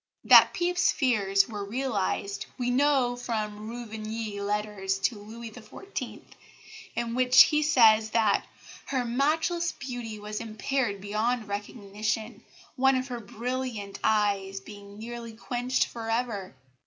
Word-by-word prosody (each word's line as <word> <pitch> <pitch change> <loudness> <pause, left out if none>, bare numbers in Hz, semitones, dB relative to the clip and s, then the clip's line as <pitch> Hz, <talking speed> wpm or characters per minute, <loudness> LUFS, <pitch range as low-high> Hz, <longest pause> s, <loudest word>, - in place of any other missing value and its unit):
That - - +8
Pepys's 355 0 +2
fears 200 -7 +2
were 210 -3 -5
realised 200 -3 -2
we 245 -1 0
know 260 -2 +3
from 215 -3 -4
Ruvigny's 220 -2 -5
letters 205 -1 -1
to 205 +2 -1
Louis 225 +2 -9
XIV., 300 - -7 0.7
in 235 -1 -2
which 250 0 +7
he 300 -1 +1
says 225 -7 +5
that 220 -2 +2 0.4
"her 260 -3 -1
matchless 315 +7 +1
beauty 245 -5 -6
was 210 0 -5
impaired 225 -1 -2
beyond 215 +3 -1
recognition, 210 +2 -4 0.3
one 265 0 +4
of 255 +1 -2
her 245 -1 -4
brilliant 230 -1 -4
eyes 200 -3 +1
being 200 0 -12
nearly 230 +1 -7
quenched 245 +3 -1
for 225 -1 -7
ever." 225 - -2
225 Hz, 125 wpm, -28 LUFS, 210-250 Hz, 0.7 s, That